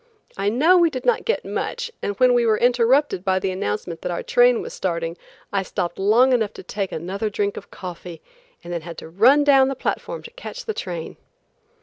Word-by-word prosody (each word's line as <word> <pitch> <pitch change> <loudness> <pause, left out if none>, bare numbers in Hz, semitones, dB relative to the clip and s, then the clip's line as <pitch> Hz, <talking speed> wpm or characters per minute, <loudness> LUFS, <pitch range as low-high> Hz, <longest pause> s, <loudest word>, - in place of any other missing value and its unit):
I 200 +1 0
know 315 - +4
we 340 -1 +4
did 260 -5 -6
not 485 - +2
get 465 - -1
much, 480 -1 -3
and 200 - -3
when 255 -1 +5
we 240 -1 +3
were 220 -2 +3
interrupted 245 -2 +2
by 190 -1 +1
the 190 0 -1
announcement 165 - -4
that 180 - -3
our 170 - -3
train 245 -1 +4
was - - -7
starting, 170 -2 -2 0.4
I 195 - +2
stopped 180 -2 -4
long 230 +7 +4
enough 220 -4 +1
to - - -10
take 195 +1 -4
another 190 +6 -3
drink 205 0 -1
of - - -9
coffee 175 -2 -8 0.4
and 175 - -6
then 170 - -3
had 165 0 -9
to - - -9
run 245 - +5
down 270 -2 +5
the 270 - -2
platform - - -4
to 465 - -11
catch - - -8
the 440 - -2
train. 175 - -6
210 Hz, 215 wpm, -22 LUFS, 180-265 Hz, 0.4 s, when